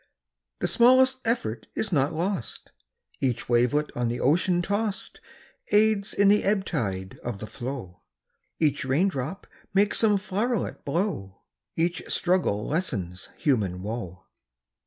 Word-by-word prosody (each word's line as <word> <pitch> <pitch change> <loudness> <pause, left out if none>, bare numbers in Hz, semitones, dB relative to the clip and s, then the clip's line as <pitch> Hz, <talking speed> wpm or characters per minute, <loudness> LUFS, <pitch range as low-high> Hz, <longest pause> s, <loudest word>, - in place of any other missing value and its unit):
The - - +1
smallest 260 +2 +5
effort 120 - -1
is 220 - -1
not 145 -2 +2
lost; 170 - -3 0.5
Each 125 -4 -1
wavelet 125 +5 +2
on 120 -1 0
the 120 +1 -2
ocean 175 +5 +2
toss'd 205 +3 -2 0.5
Aids 210 -1 +3
in 200 - +4
the 210 +1 +4
ebb 195 -1 +1
tide 95 - -3
of 120 -4 -5
the 110 - -6
flow; 120 -7 -7 0.6
Each 150 -3 +1
rain 145 +9 +2
drop 155 +4 -5 0.3
makes 200 +1 +3
some 210 -3 +4
flow'ret 210 +4 -2
blow 140 - -2 0.3
Each 170 +1 0
struggle 175 - +1
lessens 100 - -3
human 100 - 0
woe. 105 -5 -5
155 Hz, 130 wpm, -26 LUFS, -, 0.6 s, smallest